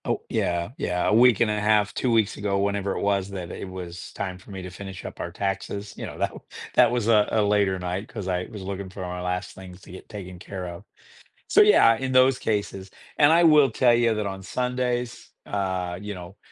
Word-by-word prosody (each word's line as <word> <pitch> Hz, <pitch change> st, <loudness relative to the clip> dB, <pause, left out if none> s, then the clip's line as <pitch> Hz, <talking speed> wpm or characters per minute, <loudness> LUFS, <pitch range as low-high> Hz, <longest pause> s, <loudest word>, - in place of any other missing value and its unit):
Oh, -, -, -1 dB
yeah, 85 Hz, 0 st, -1 dB
yeah, 90 Hz, 0 st, 0 dB
a -, -, +2 dB
week 120 Hz, -1 st, +5 dB
and 110 Hz, -2 st, +3 dB
a 105 Hz, -, -1 dB
half, 105 Hz, 0 st, +2 dB
2 125 Hz, -, 0 dB
weeks 110 Hz, -2 st, +2 dB
ago, 100 Hz, -1 st, -1 dB
whenever 100 Hz, 0 st, -1 dB
it -, -, -3 dB
was 100 Hz, -1 st, 0 dB
that 90 Hz, -3 st, -6 dB
it 95 Hz, -, -7 dB
was 90 Hz, -2 st, -8 dB
time 95 Hz, -2 st, -5 dB
for 95 Hz, -, -18 dB
me 95 Hz, -2 st, -7 dB
to 90 Hz, -, -7 dB
finish 95 Hz, +1 st, -9 dB
up -, -, -8 dB
our -, -, -4 dB
taxes, 100 Hz, +1 st, -4 dB
you -, -, -6 dB
know, -, -, -9 dB
that -, -, 0 dB
w -, -, -11 dB, 0.3 s
that -, -, +6 dB
was 120 Hz, -2 st, -1 dB
a 105 Hz, -3 st, +4 dB
a 110 Hz, -, +2 dB
later 100 Hz, -2 st, +2 dB
night 90 Hz, +3 st, -4 dB
'cause 105 Hz, -6 st, -7 dB
I 90 Hz, -1 st, -1 dB
was 105 Hz, -4 st, -8 dB
looking 95 Hz, 0 st, -5 dB
for 95 Hz, +1 st, -9 dB
my 90 Hz, 0 st, -5 dB
last 90 Hz, +1 st, -3 dB
things 90 Hz, -1 st, -11 dB
to -, -, -14 dB
get 95 Hz, -, -12 dB
taken 95 Hz, -3 st, -8 dB
care 95 Hz, 0 st, -6 dB
of. 85 Hz, +2 st, -8 dB, 0.7 s
So, -, -, +6 dB
yeah, 415 Hz, -, +6 dB
in 130 Hz, +3 st, -3 dB
those 130 Hz, 0 st, +5 dB
cases, 100 Hz, -4 st, -3 dB, 0.3 s
and 145 Hz, +1 st, +6 dB
I 170 Hz, +1 st, +5 dB
will 150 Hz, -5 st, +6 dB
tell 120 Hz, +1 st, +4 dB
you 120 Hz, -1 st, +3 dB
that 105 Hz, -2 st, -2 dB
on 95 Hz, 0 st, -6 dB
Sundays, 125 Hz, +1 st, -2 dB, 0.2 s
uh, 95 Hz, -3 st, -2 dB
you 105 Hz, +1 st, -6 dB
know, 90 Hz, +1 st, -10 dB
100 Hz, 235 wpm, -25 LUFS, 95-110 Hz, 0.7 s, that